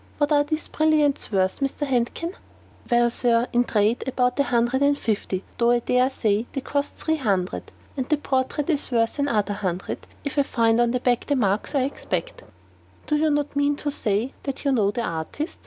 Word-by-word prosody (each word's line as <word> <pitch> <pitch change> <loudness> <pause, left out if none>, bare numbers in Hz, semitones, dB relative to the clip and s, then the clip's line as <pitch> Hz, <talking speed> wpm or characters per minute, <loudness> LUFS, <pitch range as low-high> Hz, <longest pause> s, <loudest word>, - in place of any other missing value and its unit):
What 290 0 +1
are 290 -1 +5
these 310 +1 -3
brilliants 305 -4 +1
worth, 190 -2 +1
Mr. 275 +1 -1
Handkin?" 270 +7 -1 0.6
"Well, 240 -1 +3
Sir, 235 0 +2
in 240 - +4
the 245 - -2
trade, 215 +2 +2
about 250 0 0
a - - +5
hundred 240 +2 +1
and 285 0 +3
fifty, 200 -5 -2 0.2
though 235 0 +4
I 240 - +5
dare 250 +2 +2
say 220 -3 0
they 275 - -2
cost 285 +1 -2
three 315 0 -1
hundred. 195 -9 -1 0.2
And 260 -2 -3
the 305 - +3
portrait 280 +3 -1
is 295 -2 -1
worth 230 +2 0
another 215 -8 +1
hundred, 190 -3 -4 0.2
if 285 0 -2
I - - +7
find 230 -3 +2
on 240 - +3
the 250 +1 0
back 245 -1 +1
the 285 - +2
marks 210 +2 0
I 270 - +3
expect." 395 - -3 0.7
"You 300 - +4
do 315 0 +3
not 295 -1 -1
mean 285 0 +2
to 290 0 -3
say 225 0 0
that 275 0 -5
you 280 - +3
know 215 -6 +3
the 235 +3 -2
artist?" 165 - -4
250 Hz, 205 wpm, -24 LUFS, 230-285 Hz, 0.7 s, I